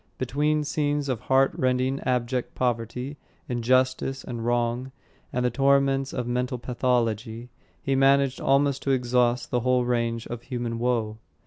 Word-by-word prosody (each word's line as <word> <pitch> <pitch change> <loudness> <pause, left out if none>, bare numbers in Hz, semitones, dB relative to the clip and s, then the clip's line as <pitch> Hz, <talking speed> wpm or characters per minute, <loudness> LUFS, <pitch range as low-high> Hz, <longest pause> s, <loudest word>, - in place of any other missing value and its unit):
Between 150 +4 0
scenes 145 -1 -1
of 125 -4 -1
heart 135 +3 +3
rending, 130 +1 0
abject 125 0 -1
poverty, 125 +3 -2 0.3
injustice, 130 +2 +1
and 120 -2 -5
wrong, 120 +2 0 0.4
and 125 0 -1
the 125 - +2
torments 135 +1 +2
of 125 - -3
mental 125 +1 -1
pathology, 120 -2 -1 0.3
he 135 - -1
managed 135 0 +3
almost 140 0 +2
to - - -3
exhaust 125 -1 +1
the 125 - +2
whole 125 0 +2
range 115 -1 -1
of 120 -1 -6
human 120 -2 -4
woe. 115 -3 -1
125 Hz, 140 wpm, -25 LUFS, 120-135 Hz, 0.4 s, heart